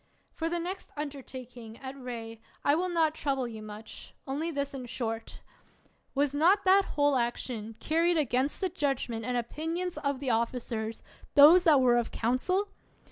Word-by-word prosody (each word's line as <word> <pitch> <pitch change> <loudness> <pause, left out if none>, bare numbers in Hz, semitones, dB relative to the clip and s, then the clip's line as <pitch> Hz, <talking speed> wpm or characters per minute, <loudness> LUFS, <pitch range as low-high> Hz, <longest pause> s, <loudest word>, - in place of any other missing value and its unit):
For 325 0 -2
the 345 - -1
next 360 +3 -5
undertaking, 255 -5 -7
at 265 0 -7
Rhee, 230 -4 -7 0.2
I 285 - +5
will 360 +4 +1
not 325 -3 +2
trouble 270 -5 -1
you 220 -2 -8
much; 215 +1 -10
only 290 +5 -2
this 280 -3 -2
in 255 -2 -6
short: 225 -2 -4 0.7
Was 285 0 +2
not 360 +8 +4
that 385 +1 +6
whole 290 -1 +3
action 235 -2 -2
carried 335 +2 +2
against 275 -1 0
the 375 - +1
judgment 270 -8 -2
and 245 +2 -1
opinions 325 +9 -3
of 280 -2 -1
the 265 -3 -1
officers 225 -1 -2 0.2
— - - -23
those 325 +5 +8
that 300 -5 +6
were 245 -1 +5
of 235 -1 0
council 365 - 0
275 Hz, 165 wpm, -29 LUFS, 240-320 Hz, 0.7 s, those